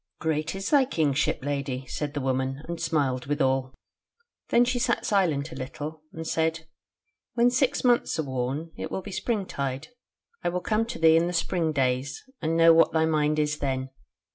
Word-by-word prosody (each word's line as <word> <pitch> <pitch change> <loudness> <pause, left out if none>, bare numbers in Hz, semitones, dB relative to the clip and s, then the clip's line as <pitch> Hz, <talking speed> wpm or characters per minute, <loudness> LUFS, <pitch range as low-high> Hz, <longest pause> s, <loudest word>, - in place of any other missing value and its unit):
"'Great 160 +1 -1
is 195 0 -4
thy 285 -3 +6
Kingship, 150 - 0
Lady,' 140 -2 -2
said 145 +3 -4
the - - 0
woman, 130 +1 -1
and 170 -1 -5
smiled 140 -6 0
withal. 135 -3 +1 0.8
Then 240 +1 +5
she 245 0 0
sat 240 -1 0
silent 165 -7 +1
a - - -8
little, 150 +4 -6
and 160 0 -7
said: 160 0 0 0.7
'When 240 +1 +4
six 260 +2 +1
months 245 -2 +2
are 160 - 0
worn, 135 +4 -3
it - - -5
will 190 - -4
be 200 - -8
springtide; 155 - -3 0.5
I - - +1
will 180 +1 -1
come 220 +4 0
to 235 - -5
thee 160 0 +6
in 170 +1 +2
the 175 - -3
spring 165 -1 0
days, 130 -1 -1 0.2
and 165 0 0
know 165 0 +7
what 165 0 +4
thy 160 0 +3
mind 155 -1 +1
is 150 0 0
then. 130 -1 -2
160 Hz, 185 wpm, -26 LUFS, 140-175 Hz, 0.8 s, know